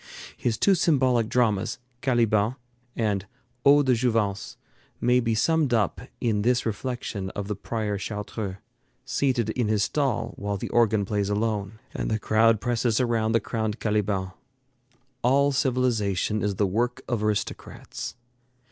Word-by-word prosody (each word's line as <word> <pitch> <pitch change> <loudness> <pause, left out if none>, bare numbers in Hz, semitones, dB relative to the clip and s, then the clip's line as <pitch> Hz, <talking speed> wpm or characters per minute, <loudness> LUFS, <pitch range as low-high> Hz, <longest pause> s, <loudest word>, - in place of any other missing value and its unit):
His 115 -2 -1
two 200 - +4
symbolic 130 -10 +2
dramas 115 -2 +1 0.2
'Caliban' 115 -3 +2 0.4
and 100 -4 -1 0.4
'Eau 145 +1 +6
de 130 -2 +3
Jouvence' 110 -5 0 0.4
may 125 +1 +3
be 115 -2 0
summed 155 0 +2
up 105 -6 0 0.2
in 110 -4 +1
this 125 +3 +2
reflection 110 -3 -3
of 100 -1 -4
the 105 - -2
prior 110 0 -3
of 100 - -3
Chartreux, 105 -2 -4 0.5
seated 125 -6 0
in 120 -1 -1
his 105 -1 +2
stall 120 -5 -1
while 100 0 -2
the - - -5
organ 110 -3 +3
plays 100 0 -1
alone, 105 -1 -1 0.2
and - - -3
the 110 - +1
crowd 110 +1 +3
presses 120 0 0
around 115 -3 +1
the 115 - +4
crowned 110 0 -3
Caliban: 105 -3 0 0.9
"A11 140 +3 +3
civilization 115 -7 +1
is 105 -1 -1
the 100 - +2
work 120 +6 -1
of 120 -4 -1
aristocrats." 105 -1 -3
110 Hz, 145 wpm, -26 LUFS, 105-125 Hz, 0.9 s, Eau